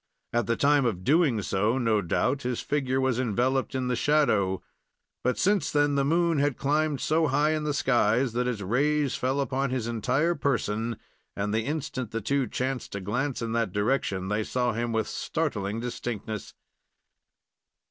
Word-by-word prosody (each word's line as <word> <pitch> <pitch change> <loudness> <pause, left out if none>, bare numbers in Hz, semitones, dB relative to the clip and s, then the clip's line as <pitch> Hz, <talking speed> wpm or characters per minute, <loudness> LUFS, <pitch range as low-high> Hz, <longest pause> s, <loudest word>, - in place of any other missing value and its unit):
At 120 -3 +1
the 115 - +2
time 145 +1 +3
of 90 -6 -3
doing 140 - +3
so, 105 +7 +1
no 115 -4 +2
doubt 130 +10 0
his 125 -2 -2
figure 135 -3 0
was 130 -2 +1
enveloped 130 +3 0
in 130 -1 -1
the 125 - +1
shadow, 115 -11 +2 0.6
but 125 0 +1
since 200 0 +2
then 145 -1 +2
the 140 0 +2
moon 165 +1 +2
had 145 -2 +1
climbed 150 0 +1
so 160 +5 +2
high 145 +3 +2
in 155 -1 -1
the 150 - 0
sky 120 -3 +3
that 125 -1 -1
its 120 -4 -2
rays 140 +7 +1
fell 130 +1 -1
upon 135 0 0
his 125 -3 -2
entire 125 +8 +1
person, 115 -6 -1 0.4
and 105 +1 -2
the 110 0 0
instant 140 -5 -3
the 115 - -3
two 135 +4 0
chanced 130 0 -3
to 100 - -3
glance 120 +7 -2
in 115 - -3
that 115 -5 0
direction, 105 -4 0
they 105 +2 0
saw 125 +1 0
him 120 +1 -2
with 110 -1 0
startling 110 -10 -2
distinctness. 115 -3 -5
125 Hz, 175 wpm, -27 LUFS, 110-140 Hz, 0.6 s, time